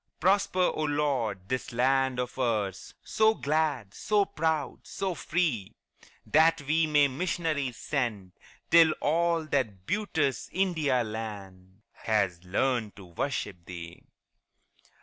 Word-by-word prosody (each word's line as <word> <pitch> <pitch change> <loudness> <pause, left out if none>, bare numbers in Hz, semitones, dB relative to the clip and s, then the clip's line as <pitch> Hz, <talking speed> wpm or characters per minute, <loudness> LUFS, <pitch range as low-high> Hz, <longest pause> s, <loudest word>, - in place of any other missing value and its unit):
Prosper, 185 0 +2
O - - -3
Lord, 135 -10 -1
this 130 +2 -3
land 130 +1 +2
of 125 +1 -4
ours, 105 -6 -1
So 220 0 +3
glad, 145 - -1
so 210 -2 +1
proud, 160 -4 -1
so 190 -2 -2
free, 150 - -1 0.5
That 160 -1 +4
we 160 +3 +2
may 145 -2 +4
missionaries 145 -3 -2
send 110 -10 -2 0.4
Till 165 -1 +7
all 165 +2 +1
that 105 -10 -2
beauteous 160 - -1
India 160 -9 +1
land 100 -3 -8
Has 95 -6 -1
learned 110 +3 0
to 100 - -12
worship 90 0 -4
Thee. 85 -1 -9
135 Hz, 115 wpm, -28 LUFS, 105-160 Hz, 0.5 s, Till